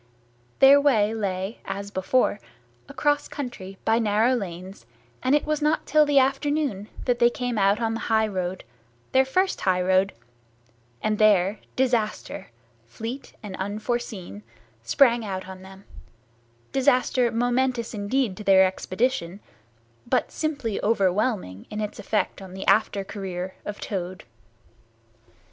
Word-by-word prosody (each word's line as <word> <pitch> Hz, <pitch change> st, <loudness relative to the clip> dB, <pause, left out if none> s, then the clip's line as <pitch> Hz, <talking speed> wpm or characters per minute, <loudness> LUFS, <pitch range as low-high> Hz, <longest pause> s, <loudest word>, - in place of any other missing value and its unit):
Their 275 Hz, +1 st, +7 dB
way 220 Hz, -7 st, +3 dB
lay, 195 Hz, -1 st, -3 dB
as 200 Hz, +1 st, -5 dB
before, 205 Hz, +3 st, +1 dB, 0.5 s
across 290 Hz, 0 st, 0 dB
country 215 Hz, -9 st, -7 dB
by 225 Hz, +1 st, +3 dB
narrow 220 Hz, +3 st, +2 dB
lanes, 190 Hz, -4 st, -6 dB, 0.3 s
and 260 Hz, +3 st, +3 dB
it 295 Hz, -, +1 dB
was 305 Hz, 0 st, -1 dB
not 300 Hz, +1 st, +1 dB
till 300 Hz, +1 st, +4 dB
the 290 Hz, -1 st, +2 dB
afternoon 275 Hz, -5 st, +1 dB, 0.2 s
that 245 Hz, -1 st, +1 dB
they 240 Hz, -, +6 dB
came 245 Hz, 0 st, -3 dB
out 200 Hz, +2 st, +3 dB
on 225 Hz, -1 st, 0 dB
the 225 Hz, -, -3 dB
high 220 Hz, -1 st, +3 dB
road, 185 Hz, -2 st, -3 dB, 0.5 s
their 265 Hz, 0 st, +4 dB
first 370 Hz, +8 st, 0 dB
high 185 Hz, -1 st, +2 dB
road; 185 Hz, +1 st, +2 dB, 0.9 s
and 215 Hz, -1 st, 0 dB
there 205 Hz, -1 st, +4 dB, 0.2 s
disaster, 240 Hz, -5 st, -1 dB, 0.4 s
fleet 225 Hz, -, -7 dB
and 200 Hz, -3 st, -6 dB
unforeseen, 205 Hz, -, -4 dB, 0.4 s
sprang 235 Hz, -, +3 dB
out 190 Hz, -3 st, -5 dB
on 190 Hz, 0 st, -9 dB
them—disaster 190 Hz, -, -2 dB
momentous 245 Hz, 0 st, 0 dB
indeed 210 Hz, +1 st, -1 dB
to 215 Hz, -, -7 dB
their 190 Hz, -1 st, +6 dB
expedition, 185 Hz, 0 st, -2 dB, 0.7 s
but -, -, +1 dB
simply 285 Hz, -9 st, -2 dB
overwhelming 200 Hz, -, 0 dB
in 210 Hz, -, -5 dB
its 210 Hz, -1 st, -4 dB
effect 210 Hz, -2 st, -1 dB
on 190 Hz, -1 st, -10 dB
the 190 Hz, -, -6 dB
after 205 Hz, -2 st, +2 dB
career 190 Hz, -2 st, -5 dB
of 205 Hz, 0 st, -6 dB
Toad. 185 Hz, -2 st, -5 dB
215 Hz, 130 wpm, -25 LUFS, 190-250 Hz, 0.9 s, Their